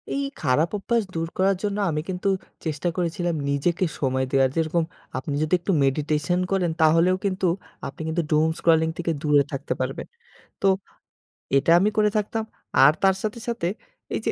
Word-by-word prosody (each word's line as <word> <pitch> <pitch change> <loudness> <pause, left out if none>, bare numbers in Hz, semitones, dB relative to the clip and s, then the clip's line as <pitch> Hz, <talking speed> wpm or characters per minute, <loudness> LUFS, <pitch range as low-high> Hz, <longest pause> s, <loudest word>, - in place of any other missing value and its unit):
এই 280 - -1 0.2
খারাপ 150 +3 +2
অভ্যাস 230 +3 0
দূর 165 0 -1
করার 195 +1 +3
জন্য 205 -1 -1
আমি 155 -1 -1
কিন্তু 185 +1 -1 0.4
চেষ্টা 160 +2 -1
করেছিলাম 175 -1 -1
নিজেকে 165 +6 +1
সময় 130 -1 0
দেওয়া 135 -1 +4
যেরকম 165 +1 +1 0.3
আপনি 135 +3 -4
যদি 155 +2 -1
একটু 185 - -2
মেডিটেশন 150 +4 0
করেন 180 -3 +1
তাহলেও 165 +3 +5
কিন্তু 185 -1 0 0.4
আপনি 140 +3 -9
কিন্তু 165 +2 0
doom 155 +1 +4
scrolling 160 -1 +3
থেকে 170 -1 -1
দূরে 145 -2 +4
থাকতে 140 +1 -3
পারবেন। - - -3 0.5
তো 195 - +3 0.9
এটা 145 +4 +1
আমি 205 +3 +3
করে 210 -1 +4
থাকতাম। 215 +1 -1 0.4
আর 145 - +8
তার 190 -1 +4
সাথে, 215 +1 -3
সাথে 230 -7 -1 0.5
এইযে - - -1
165 Hz, 165 wpm, -24 LUFS, 150-190 Hz, 0.9 s, আর